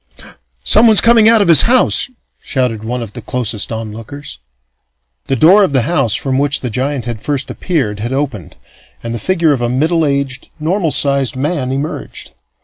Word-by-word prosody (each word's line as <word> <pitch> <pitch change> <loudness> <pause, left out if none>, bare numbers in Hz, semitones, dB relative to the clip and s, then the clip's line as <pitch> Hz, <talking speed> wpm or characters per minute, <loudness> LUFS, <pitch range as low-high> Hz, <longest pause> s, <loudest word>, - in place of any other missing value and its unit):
"Someone's 220 -1 +5
coming 230 -2 +5
out 225 -2 +4
of - - -3
his 165 -3 +7
house!" 255 +2 +2 0.3
shouted 125 -5 -2
one 120 +2 -4
of 110 - -10
the 120 - -8
closest 115 -2 -2
onlookers. 115 - -8 0.9
The 135 - 0
door 180 - +5
of 185 - 0
the 130 -3 +3
house 135 -6 +1
from 135 -1 -1
which 145 0 0
the 125 - -4
giant 130 +2 -2
had 115 -3 -6
first 140 +2 -2
appeared 130 - -2
had 115 +4 -4
opened, 130 - -4 0.5
and 115 0 -4
the 115 - -4
figure 170 -2 +1
of 130 - -3
a 120 - -1
middle 160 +6 0
aged, 140 -3 -2
normal 165 +2 -1
sized 140 -3 +1
man 135 -1 -2
emerged. 140 +3 -6
135 Hz, 175 wpm, -14 LUFS, 120-160 Hz, 0.9 s, his